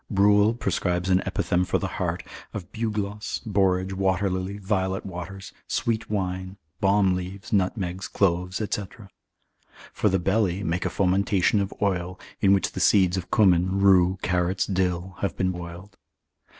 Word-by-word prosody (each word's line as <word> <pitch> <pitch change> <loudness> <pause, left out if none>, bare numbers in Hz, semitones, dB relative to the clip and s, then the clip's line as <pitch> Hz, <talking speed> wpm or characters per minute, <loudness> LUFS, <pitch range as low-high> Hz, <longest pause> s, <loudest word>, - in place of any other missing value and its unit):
Bruel 105 +2 +4
prescribes 90 -5 -1
an 90 +1 +4
epithem 90 +1 0
for - - 0
the - - -3 0.2
heart, - - -1 0.3
of 95 -2 -6
bugloss, 105 -2 -3
borage, 95 -2 +1
water 95 0 +1
lily, 95 +2 -3
violet 95 -1 -1
waters, 95 +1 -7
sweet 115 -2 -1
wine, 95 -1 -3 0.2
balm 100 -1 +3
leaves, 95 +4 -6
nutmegs, 95 -1 -1
cloves, 90 -1 0
&c. 105 -1 -2 1.1
For 105 - +1
the 95 - +2
belly, 95 0 0
make 85 +2 -1
a - - +1
fomentation 100 +1 +2
of 100 -1 -2
oil, 90 -2 -1 0.2
in 95 - +4
which 100 -1 +2
the - - -5
seeds 95 -3 +4
of 95 -2 -4
cumin, 95 -3 +3
rue, 95 -1 +5
carrots, 90 +1 +1
dill, 90 -1 -1
have 100 - -2
been 95 0 +1
boiled. 90 +3 -9
95 Hz, 150 wpm, -25 LUFS, 90-100 Hz, 1.1 s, rue